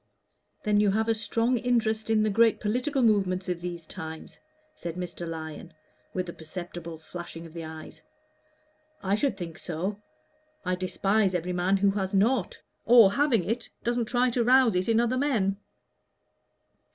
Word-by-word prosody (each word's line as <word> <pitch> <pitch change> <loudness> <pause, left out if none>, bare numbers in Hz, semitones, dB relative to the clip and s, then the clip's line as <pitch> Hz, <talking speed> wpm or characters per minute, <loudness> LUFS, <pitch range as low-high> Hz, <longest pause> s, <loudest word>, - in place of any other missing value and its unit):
"Then 210 -1 +3
you 210 -1 +4
have 220 +3 +1
a 225 - +3
strong 230 +2 0
interest 225 -2 0
in 220 -1 +3
the 215 - +1
great 225 +2 +4
political 250 +6 0
movements 195 -4 +2
of 180 -2 -2
these 175 -2 -5
times?" 160 0 -8 0.3
said 170 -1 -6
Mr. 175 -1 -5
Lyon, 160 -2 -7 0.4
with 185 -1 -3
a 170 - -6
perceptible 170 0 -7
flashing 165 +1 -8
of 165 - -12
the 170 -1 -6
eyes. 160 0 -9 1.0
"I 195 0 0
should 270 +6 +1
think 165 -3 -7
so. 185 +5 -4 0.6
I 185 - 0
despise 190 +2 +1
every 180 +1 -2
man 180 +2 +2
who 200 0 +3
has 195 0 -2
not 215 +1 +2 0.3
or, 230 -4 +7
having 245 -4 +2
it, 230 +3 -2
doesn't 240 0 0
try 245 +2 +2
to 235 0 +1
rouse 250 -1 +5
it 180 +4 0
in 225 0 +4
other 240 +2 +1
men." 215 -9 +1
195 Hz, 165 wpm, -27 LUFS, 175-230 Hz, 1.0 s, or